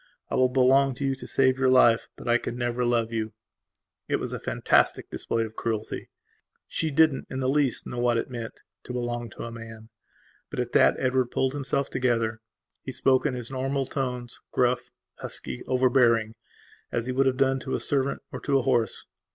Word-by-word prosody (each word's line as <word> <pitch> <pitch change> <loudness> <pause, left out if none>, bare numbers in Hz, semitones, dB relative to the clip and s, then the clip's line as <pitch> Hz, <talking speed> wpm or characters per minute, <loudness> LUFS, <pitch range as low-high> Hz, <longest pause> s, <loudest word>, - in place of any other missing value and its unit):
I - - 0
will 130 0 +4
belong 130 +1 +4
to 140 - -3
you 135 - +1
to 135 - -9
save 130 -1 +2
your 130 -1 +3
life. 120 -3 +5
But - - -10
I 120 0 +4
can 120 - -5
never 120 0 -1
love 115 -1 +1
you." 110 -1 -2 0.7
It - - +1
was - - -3
a - - -3
fantastic - - +1
display 115 - -1
of 110 0 -7
cruelty. 110 -2 -3 0.6
She 160 - -1
didn't 155 -1 +3
in 130 - -4
the 130 - 0
least 140 -1 +1
know 120 - -5
what 120 -1 +2
it - - -1
meantto 120 0 -9
belong 120 -1 -3
to - - -9
a 115 - -6
man. 115 -1 -10 0.6
But, - - -5
at 125 -1 -2
that - - +5
Edward 130 -1 +1
pulled 130 +1 0
himself 140 -1 -1
together. 115 -3 0 0.4
He - - -6
spoke 130 +2 +2
in 135 - -2
his 120 0 -4
normal 135 +1 -1
tones; 125 -3 -4
gruff, 125 0 +1 0.3
husky, 65 -2 -5
overbearing, 120 -3 +3 0.6
as 115 - -1
he 130 - -2
would 135 +1 +2
have 130 -1 +1
done 135 0 +2
to 130 0 -3
a - - -1
servant 140 -1 -1
or - - -5
to 140 -1 +1
a 135 - 0
horse. 120 -5 0
125 Hz, 195 wpm, -26 LUFS, 115-135 Hz, 0.7 s, life